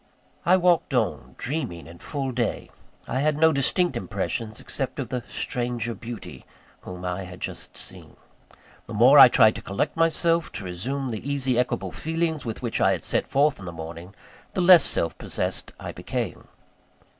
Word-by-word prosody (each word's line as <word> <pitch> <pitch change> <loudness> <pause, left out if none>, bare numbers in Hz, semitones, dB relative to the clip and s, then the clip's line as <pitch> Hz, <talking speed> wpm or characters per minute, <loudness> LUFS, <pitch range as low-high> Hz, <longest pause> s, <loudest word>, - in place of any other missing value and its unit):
I 185 +2 +6
walked 175 -6 +2
on, 115 -4 -1
dreaming 120 - -4
in 85 +1 -13
full 135 -3 -3
day 120 -2 -2 0.4
I 130 - -1
had 150 +1 +1
no 160 +1 +5
distinct 140 +3 +2
impressions, 110 0 -3
except 135 -2 -4
of 135 -4 -4
the 125 -2 -3
stranger 120 -1 -2
beauty 115 +1 -9 0.4
whom 90 0 -8
I 90 +1 -3
had 90 0 -10
just - - -5
seen. - - -7 0.7
The 115 - -6
more 130 +7 +7
I 135 - +12
tried 110 -2 +5
to - - -7
collect 100 +1 -2
myself, 165 0 +2
to 105 - -6
resume 130 +10 -3
the 115 +4 -5
easy, 130 -3 +1
equable 125 - -1
feelings 160 -2 -2
with 115 +2 -5
which 120 - -1
I - - +4
had - - -4
set - - 0
forth 145 +2 +2
in 95 - -9
the 85 - -5
morning, 85 +4 -9 0.4
the 185 - +1
less 175 -1 +8
self 85 - +2
possessed - - -3
I - - -6
became. - - -5
125 Hz, 175 wpm, -25 LUFS, 105-150 Hz, 0.7 s, I